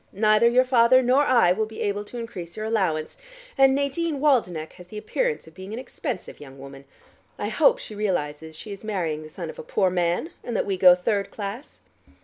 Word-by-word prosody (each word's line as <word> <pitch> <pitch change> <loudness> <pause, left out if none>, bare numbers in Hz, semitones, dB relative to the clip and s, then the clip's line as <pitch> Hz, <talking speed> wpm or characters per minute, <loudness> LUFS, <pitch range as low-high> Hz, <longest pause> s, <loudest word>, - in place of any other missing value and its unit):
"Neither 215 +3 +4
your 250 +2 +4
father 255 0 +4
nor 255 +3 +4
I 240 -10 +4
will 215 +4 0
be 220 - -9
able 205 0 -1
to 240 - -9
increase 215 -8 -7
your 215 - -4
allowance, 185 -9 -1 0.4
and 270 -1 +5
Nadine 285 +2 -1
Waldenech 200 - +1
has 180 - -14
the 210 - -9
appearance 460 - -2
of 160 - -16
being 190 +4 -9
an - - -5
expensive 250 -7 -6
young 135 -2 -12
woman. 135 0 -11 0.5
I - - -3
hope - - +4
she 360 - -10
realizes 160 -6 -3
she 210 +6 -9
is 200 +1 -8
marrying 175 -8 -2
the 155 - -10
son 165 0 -6
of - - -15
a - - -6
poor 185 +4 +1
man, 175 - -1
and 240 - -5
that - - 0
we 195 - -1
go 180 -1 +7
third 200 +2 -1
class." 210 +6 -7
205 Hz, 210 wpm, -24 LUFS, 175-245 Hz, 0.5 s, go